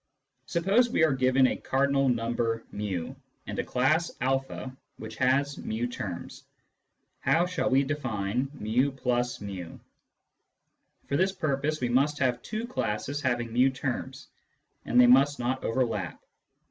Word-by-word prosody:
Suppose 195 +8 +2
we 230 - +2
are 155 -3 +4
given 130 0 +3
a - - +2
cardinal 135 0 +1
number 115 -1 -1
[i, 95 -5 -3 0.3
and - - -5
a - - +1
class 155 +7 +1
a 135 0 -1 0.3
which - - -9
has 140 +2 +2
fi 110 +2 -3
terms. 100 -8 -6 0.8
How 160 +6 +3
shall 165 -8 -1
we 135 +1 +4
define 125 -4 -2
fi+fi? 120 - -2 1.3
For 140 - -1
this 190 +2 +2
purpose 155 -3 -1
we 120 - 0
must 140 +4 +2
have 125 -3 0
two 220 +2 -4
classes 140 - -3
having 120 -3 -1
fi 125 +3 +5
terms, 130 -1 -5 0.6
and 120 - +3
they 125 - +9
must 135 +4 +5
not 125 +2 -2
overlap. 115 -8 -1
130 Hz, 135 wpm, -28 LUFS, 120-140 Hz, 1.3 s, they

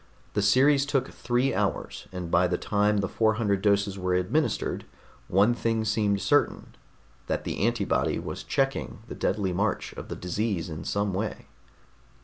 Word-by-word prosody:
The 105 - +1
series 135 +7 +4
took 135 -3 0
three 125 +3 0
hours, - - -2
and 90 -2 -5
by 90 +1 +4
the 90 0 0
time 105 0 +1
the 95 - -1
four 110 +2 +2
hundred 100 -4 0
doses 100 -1 +2
were 90 -1 0
administered, 115 - 0 0.4
one 100 +6 +4
thing 115 -2 0
seemed 105 -2 +1
certain: 125 +10 +1 0.5
that - - -1
the - - -4
antibody - - +1
was - - -5
checking 135 -6 -1
the - - -5
deadly 95 -2 -1
march 100 +3 -1
of - - -8
the - - -4
disease 95 0 -2
in 80 - -6
some 100 -1 0
way. 105 +3 -3
105 Hz, 160 wpm, -27 LUFS, 95-115 Hz, 0.5 s, series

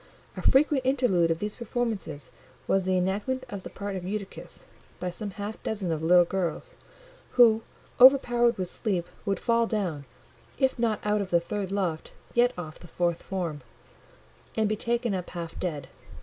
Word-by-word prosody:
A - - -5
frequent 275 0 +4
interlude 245 -11 +2
of 165 - +1
these 210 +4 -4
performances 225 - -3 0.4
was 190 -1 +2
the 185 0 +2
enactment 205 +8 -1
of 200 -3 -5
the - - -8
part 200 -1 -5
of 185 - -4
Eutychus 200 +1 -6 0.3
by 180 0 -2
some 205 +4 -6
half 205 +2 -6
dozen 200 -5 -2
of 160 -1 -1
little 175 +2 +6
girls, 190 - -3 0.6
who, 225 -3 +6 0.4
overpowered 245 -3 +6
with 185 -1 -2
sleep, 180 -2 -2 0.2
would 195 -2 0
fall 235 -1 +2
down, 180 -11 -2 0.5
if 265 -2 +1
not 225 -3 0
out 210 0 +2
of 195 - -4
the 170 - +4
third 195 +2 -4
loft, 180 -5 -2 0.2
yet 240 +1 +4
off 160 -2 -7
the 175 - -12
fourth 170 0 -1
form, 170 -6 -4 1.0
and 220 -1 +3
be 215 - 0
taken 235 0 0
up 180 -2 -3
half 170 -2 -6
dead. 150 -7 -3
200 Hz, 170 wpm, -27 LUFS, 175-235 Hz, 1.0 s, little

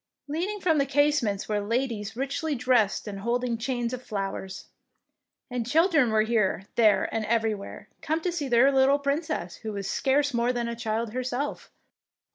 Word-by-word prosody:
Leaning 355 +8 -2
from 325 -5 +2
the 280 - +3
casements 275 -8 +1
were 210 -1 0
ladies 225 -1 -2
richly 280 +4 -2
dressed 245 -5 +1
and 200 -1 -5
holding 240 +3 -1
chains 240 0 -2
of 250 - -4
flowers; 195 -3 -5 0.9
and 245 -2 -2
children 320 -4 +4
were 215 0 +3
here, 215 -4 0
there, 220 -3 +4
and 225 - -1
everywhere, 220 -3 -2
come 315 +1 0
to 355 +2 -2
see 315 -5 -3
their 250 +2 +5
little 270 +1 +4
Princess, 285 - -2
who 220 - -6
was 200 -2 -4
scarce 285 +1 +1
more 235 +1 +2
than 240 -1 -2
a 235 - -3
child 225 -1 -2
herself. 255 +3 -3
245 Hz, 165 wpm, -27 LUFS, 220-280 Hz, 0.9 s, their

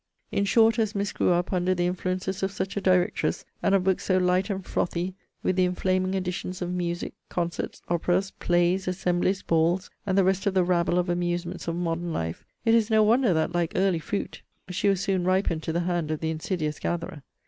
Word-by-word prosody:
In 200 - +1
short, 225 +3 +4
as 215 -1 0
Miss 200 0 -1
grew - - +1
up 175 +2 +1
under 185 0 +1
the 175 0 0
influences 185 +2 -2
of 190 0 0
such 190 0 -4
a 200 - -1
directress, 180 -2 +1 0.2
and 195 - +3
of 190 - +2
books 190 0 +1
so 185 - +3
light 185 +2 +2
and 190 -2 -3
frothy, 175 +2 -1 0.3
with 185 - +1
the 185 - +4
inflaming 185 +1 0
additions 180 0 -3
of 180 -1 -3
music, 175 -1 -3 0.2
concerts, 170 -2 -3
operas, 175 +3 +1
plays, 175 +2 +1
assemblies, 180 +1 0
balls, 170 +3 +1 0.2
and 190 0 +1
the 195 - +5
rest 190 +2 +1
of 195 - +1
the 185 - +4
rabble 175 0 +2
of 180 0 +1
amusements 175 0 -2
of 165 - -1
modern 170 0 -2
life, 80 - -3 0.2
it 225 - +4
is 230 -1 +3
no 220 -1 +5
wonder 235 +1 +4
that, 160 0 +1
like 175 -2 0
early 185 -3 +2
fruit, 200 +6 -4 0.3
she 185 +3 +1
was 195 -2 +1
soon 195 -3 0
ripened 185 -3 +1
to 160 - -3
the 170 +2 0
hand 175 -3 -1
of 155 -1 -1
the 160 0 -1
insidious 155 -2 -3
gatherer. 170 -3 -3
180 Hz, 210 wpm, -26 LUFS, 175-190 Hz, 0.3 s, the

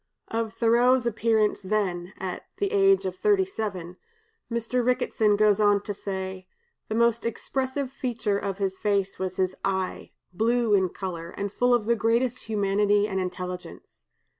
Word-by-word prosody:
'" - - -55
Of 225 -1 -2
Thoreau's 240 +2 +3
appearance 220 -2 +1
then 190 -3 -1
(at 185 -1 -5
the 400 0 -1
age 390 - +4
of 185 -1 -2
thirty 395 - +3
seven), 190 - -5 0.5
Mr. 235 +2 0
Ricketson 235 -4 +2
goes 210 -1 +4
on 205 -1 +3
to 205 - -4
say: 190 -1 -5 0.4
"The 220 - -1
most 235 0 +2
expressive 260 +3 -2
feature 230 -6 -1
of 195 -2 -3
his 190 -2 -2
face 200 -2 0
was 185 -1 -3
his 185 0 0
eye, 190 -1 -2 0.2
blue 230 +2 +2
in 190 -2 +3
color, 170 -3 -6
and 200 +2 -4
full 245 +4 +2
of 240 -3 +3
the 235 +1 +3
greatest 235 +2 0
humanity 205 -1 +2
and 190 -2 -2
intelligence. 180 0 -6
210 Hz, 160 wpm, -26 LUFS, 190-235 Hz, 0.5 s, age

